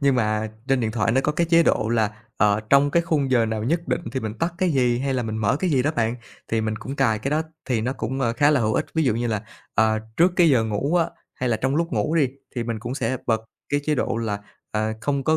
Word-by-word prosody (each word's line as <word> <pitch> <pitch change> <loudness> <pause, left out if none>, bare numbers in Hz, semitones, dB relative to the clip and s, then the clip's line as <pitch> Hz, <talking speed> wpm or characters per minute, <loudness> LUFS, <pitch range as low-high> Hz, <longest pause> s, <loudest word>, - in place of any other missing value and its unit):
Nhưng 140 -2 +3
mà 110 -2 0 0.2
trên 135 -2 +3
điện 110 -1 0
thoại 115 0 +1
nó 130 - +3
có 150 - 0
cái 170 +3 +1
chế 170 0 +6
độ 110 - +2
là, 110 -3 +2 0.3
ờ, 105 +1 +3
trong 140 +1 +5
cái 170 - +3
khung 150 -5 0
giờ 120 -3 +3
nào 110 -1 -2
nhất 165 +7 -1
định - - 0
thì 130 - -1
mình 110 -2 -4
tắt 170 +1 -1
cái 185 -2 +2
gì, 125 -3 +2
hay 135 0 -1
là 125 - 0
mình 110 -1 -3
mở 110 +4 +2
cái 185 - +1
gì 135 -4 +3
đó 145 - +1
bạn, 115 0 +1 0.3
thì 115 -1 +1
mình 110 0 -2
cũng 135 +5 -6
cái 110 -6 +2
đó, 155 +2 +1 0.2
thì 120 -4 0
nó 125 +4 -1
cũng, 135 0 -4
ờ, 120 -3 +1
khá 145 +5 +4
là 145 -4 +3
hữu 110 -1 +1
ích. - - 0
Ví 160 - +2
dụ 125 - +2
như 120 +1 -1
là, 110 -2 -1 0.3
à, 110 0 +3 0.2
trước 175 +2 +4
cái 170 -3 +6
giờ 120 -5 +3
ngủ 110 +10 0
á, 170 -2 +3 0.3
hay 125 - -2
là 115 - +2
trong 135 +4 0
lúc 165 -2 -1
ngủ 115 +8 0
đi 150 -6 +3 0.3
thì 120 - -2
mình 115 -1 -3
cũng 120 +3 -5
sẽ 130 0 -1
bật 110 -1 +2 0.3
cái 145 0 +1
chế 155 - +1
độ 125 -3 -1
là, 110 -3 -2 0.3
à, 110 0 0
không 140 +1 -1
có 160 0 +3
125 Hz, 285 wpm, -23 LUFS, 110-145 Hz, 0.3 s, chế